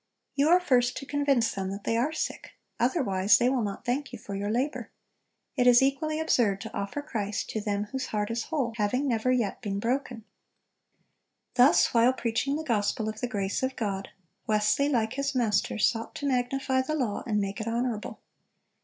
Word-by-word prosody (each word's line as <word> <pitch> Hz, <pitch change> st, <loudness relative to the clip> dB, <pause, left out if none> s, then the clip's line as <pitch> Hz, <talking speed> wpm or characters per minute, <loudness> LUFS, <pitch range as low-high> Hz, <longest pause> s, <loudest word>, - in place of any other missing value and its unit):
You 285 Hz, +2 st, +2 dB
are 355 Hz, +2 st, +6 dB
first 250 Hz, -8 st, +2 dB
to 275 Hz, -, -6 dB
convince 280 Hz, -5 st, +1 dB
them 190 Hz, -1 st, -3 dB
that 200 Hz, +1 st, -6 dB
they 230 Hz, -, 0 dB
are 250 Hz, +7 st, +1 dB
sick; 320 Hz, -, -4 dB, 0.3 s
otherwise 210 Hz, -, +3 dB
they 245 Hz, -, +2 dB
will 260 Hz, -2 st, +1 dB
not 205 Hz, +2 st, -4 dB
thank 265 Hz, +3 st, -1 dB
you 245 Hz, -, -7 dB
for 205 Hz, -2 st, -8 dB
your 200 Hz, +1 st, -2 dB
labor. 255 Hz, +7 st, -1 dB, 0.7 s
It 250 Hz, -2 st, +3 dB
is 245 Hz, +1 st, +7 dB
equally 310 Hz, +3 st, 0 dB
absurd 235 Hz, -11 st, +2 dB
to -, -, -8 dB
offer 200 Hz, +9 st, -3 dB
Christ 210 Hz, -7 st, -3 dB
to 220 Hz, -, -2 dB
them 205 Hz, 0 st, -1 dB
whose 260 Hz, +5 st, -4 dB
heart 210 Hz, 0 st, -2 dB
is 230 Hz, 0 st, -2 dB
whole, 270 Hz, -8 st, -1 dB
having 250 Hz, +7 st, 0 dB
never 240 Hz, 0 st, +1 dB
yet 235 Hz, -6 st, 0 dB
been 200 Hz, -4 st, -3 dB
broken."(382) 240 Hz, 0 st, -2 dB, 1.3 s
Thus 255 Hz, +2 st, +5 dB
while 240 Hz, +2 st, +5 dB
preaching 250 Hz, +3 st, -1 dB
the 315 Hz, -, -3 dB
gospel 215 Hz, -4 st, 0 dB
of 215 Hz, 0 st, -7 dB
the 245 Hz, -, 0 dB
grace 200 Hz, -4 st, -2 dB
of 260 Hz, 0 st, -1 dB
God, 200 Hz, -4 st, -3 dB, 0.4 s
Wesley, 215 Hz, +6 st, +2 dB
like 230 Hz, -4 st, 0 dB
his 275 Hz, +1 st, -2 dB
Master, 220 Hz, -4 st, +1 dB
sought 225 Hz, +1 st, 0 dB
to 285 Hz, -, -5 dB
"magnify 260 Hz, 0 st, 0 dB
the 310 Hz, +4 st, -2 dB
law, 240 Hz, -9 st, -1 dB
and 210 Hz, -2 st, +1 dB
make 200 Hz, +2 st, -3 dB
it 220 Hz, -, -5 dB
honorable." 230 Hz, -1 st, -2 dB
240 Hz, 190 wpm, -28 LUFS, 210-270 Hz, 1.3 s, is